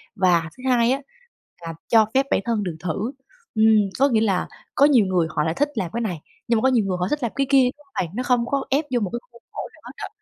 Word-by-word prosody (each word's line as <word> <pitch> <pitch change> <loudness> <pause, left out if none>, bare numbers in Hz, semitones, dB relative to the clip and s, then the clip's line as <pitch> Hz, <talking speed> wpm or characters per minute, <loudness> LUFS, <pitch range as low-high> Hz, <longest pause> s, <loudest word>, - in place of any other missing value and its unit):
Và 175 -4 +2
thứ 255 - -13
hai 240 -1 +3
á 270 +2 0 0.6
là 165 -1 -6
cho 225 -1 +5
phép 270 +1 +3
bản - - +3
thân 230 -3 0
được 175 -4 -4
thử, 185 - -3 0.4
ừm, 220 0 +4 0.3
có 275 +1 +5
nghĩa 225 -4 +2
là 195 -5 +1 0.3
có 280 - +6
nhiều 260 -8 +5
người 180 -3 +1
họ 150 -1 -1
lại 160 +1 0
thích 290 - 0
làm 180 -7 -2
cái 235 - -2
này, 180 -9 -3 0.3
nhưng 230 - +2
mà - - 0
có 265 - +3
nhiều 225 -5 +2
người 185 -2 -1
họ 180 - 0
thích 295 -2 -2
làm 235 - -1
cái 275 -1 0
kia, 275 -1 +6
đúng 295 - -22
hông 275 - -35
bạn? 170 +4 -11
Nó 250 - -2
không 245 -1 +2
có 275 +2 -1
ép 290 +3 +1
vô 245 - +2
một 205 -5 -2
cái 240 - -2
khuôn 235 - -18
khổ - - -5
nào - - -20
hết - - -9
á. - - -3
230 Hz, 290 wpm, -22 LUFS, 185-260 Hz, 0.6 s, có